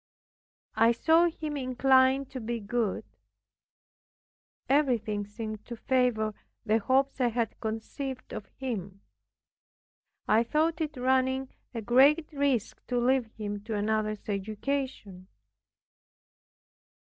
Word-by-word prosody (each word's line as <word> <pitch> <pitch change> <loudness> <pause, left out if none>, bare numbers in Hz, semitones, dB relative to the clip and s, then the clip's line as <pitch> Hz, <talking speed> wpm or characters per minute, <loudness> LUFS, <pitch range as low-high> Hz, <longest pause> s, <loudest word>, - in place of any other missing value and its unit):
I 230 +1 +5
saw 325 +7 +4
him 310 -2 -5
inclined 260 0 +3
to 260 - -5
be 235 0 -3
good; 220 0 -1 1.6
everything 230 -8 +1
seemed 215 0 -6
to 240 - -6
favor 240 -4 +1 0.3
the 220 0 +3
hopes 265 +4 +1
I 250 - +4
had 235 -2 -2
conceived 245 +4 -5
of 200 - -6
him. 200 -7 -5 1.3
I 220 +2 +4
thought 320 +6 0
it 305 -3 -3
running 260 +1 +1 0.3
a 230 - -3
great 280 +8 +4
risk 275 -6 0
to 250 - -1
leave 250 0 +2
him 205 -1 -4
to 225 -1 -3
another's 215 0 -1
education. 210 -1 -3
245 Hz, 110 wpm, -29 LUFS, 215-270 Hz, 1.6 s, I